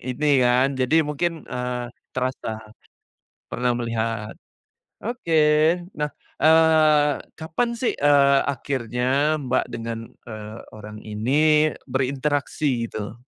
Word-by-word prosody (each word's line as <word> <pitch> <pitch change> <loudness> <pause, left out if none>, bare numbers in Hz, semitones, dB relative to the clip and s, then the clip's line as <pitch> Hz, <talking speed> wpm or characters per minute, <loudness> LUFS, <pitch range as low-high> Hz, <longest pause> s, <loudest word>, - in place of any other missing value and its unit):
ini, 130 +4 -3
kan, 125 +2 +3
jadi 135 +5 +2
mungkin, 160 +2 -2
eee, 125 0 -4 0.3
terasa, 130 -1 -2 1.0
pernah 125 0 0
melihat, 115 -2 -2 0.7
oke, 170 -10 +1 0.5
nah, 150 -5 -3 0.3
eee, 155 -2 +5 0.2
kapan, 165 +10 -2
sih, 235 +1 -2
eee, 140 -1 +5
akhirnya 135 +2 0
Mbak, 130 -1 0
dengan, 115 0 -5 0.2
eee, 110 -1 -8
orang 105 0 -10
ini 110 +5 -3 0.6
berinteraksi 135 -1 -1
gitu? 110 +1 -7
130 Hz, 100 wpm, -23 LUFS, 120-150 Hz, 1.0 s, eee